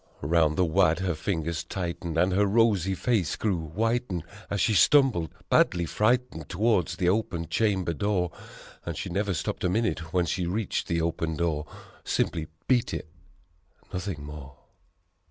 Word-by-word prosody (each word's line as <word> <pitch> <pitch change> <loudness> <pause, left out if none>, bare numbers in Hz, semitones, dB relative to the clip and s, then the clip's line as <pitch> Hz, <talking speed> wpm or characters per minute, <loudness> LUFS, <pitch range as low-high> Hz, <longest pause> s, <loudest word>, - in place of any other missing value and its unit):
'Round 75 +1 +2
the 90 - +4
wad 85 -1 +3
her 95 -2 0
fingers 80 0 -2
tightened 85 -3 -4
and 90 +2 +3
her 100 +2 +3
rosy 100 -3 +3
face 105 - 0
grew 90 -7 -1
whitened, 115 0 -1 0.3
As 100 - -1
she 110 - +3
stumbled, 115 - +4 0.2
badly 85 -1 +3
frightened, 110 -3 0
towards 95 -3 +1
the 90 0 0
open 90 -4 0
chamber 95 -3 +1
door 90 +1 0 0.5
And - - -5
she - - -4
never 100 +1 0
stopped - - -3
a 90 - +2
minute 90 -5 -1
when 90 0 +2
she 90 +1 -1
reached 100 +3 -2
the 85 -1 0
open 80 -1 -1
door 80 -2 -1 0.4
Simply 80 -2 -1 0.2
beat 125 -3 +2
it, 80 - -6 0.8
nothing 90 -5 -4
more. 75 -2 -9
90 Hz, 155 wpm, -27 LUFS, 80-105 Hz, 0.8 s, the